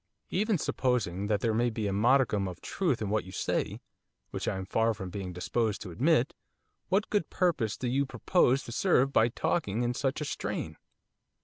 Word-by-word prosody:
'Even 210 +1 +1
supposing 105 - 0
that 105 -1 +1
there 115 -2 +1
may 120 +2 +2
be 110 -2 -3
a 100 - 0
modicum 110 -2 +3
of 90 -1 -7
truth 155 - -1
in 100 - -2
what 110 0 +1
you 95 - -11
say, - - -2 0.5
which - - -4
I - - 0
am 95 - -4
far 115 +3 +1
from 95 -2 -6
being 95 -1 -5
disposed 105 +5 -1
to 95 - -8
admit 135 - +2 0.6
what 200 +3 +1
good 205 -6 +1
purpose 145 - 0
do 125 - -3
you 135 +3 +1
propose 135 -4 +2
to - - -8
serve 135 -1 +2
by 115 - +5
talking 120 - -1
in 120 0 0
such 135 +3 -1
a 150 - -3
strain? - - -4
120 Hz, 195 wpm, -29 LUFS, 100-140 Hz, 0.6 s, by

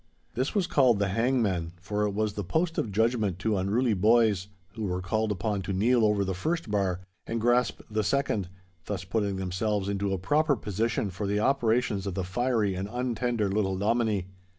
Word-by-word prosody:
This 130 - -2
was 200 -3 +2
called 130 - +4
the 100 -1 0
hangman, 100 -6 0
for 105 +3 -1
it - - 0
was 105 +1 -1
the 105 - -4
post 165 - 0
of 110 - -2
judgment 110 -3 +1
to 105 +2 0
unruly 110 +6 +1
boys, 105 -1 +3 0.3
who 110 0 -4
were 90 -2 -1
called 110 +4 -1
upon 105 0 -1
to 95 - -3
kneel 115 +5 +3
over 105 -2 +2
the 95 - -1
first 160 - -2
bar 95 -3 0 0.3
and 115 - -2
grasp 120 +1 +2
the 110 -1 -1
second, 105 -7 0 0.4
thus 100 -4 -3
putting 100 +1 -1
themselves 95 +2 -1
into 100 0 -1
a 95 - 0
proper 145 - +2
position 105 -1 -1
for 100 +3 -4
the 105 +1 +1
operations 115 -4 +1
of 95 - -3
the 95 - -1
fiery 110 +1 0
and 95 +2 -4
untender 120 -2 -1
little 95 -1 0
Dominie. 105 -2 +1
105 Hz, 190 wpm, -28 LUFS, 95-120 Hz, 0.4 s, called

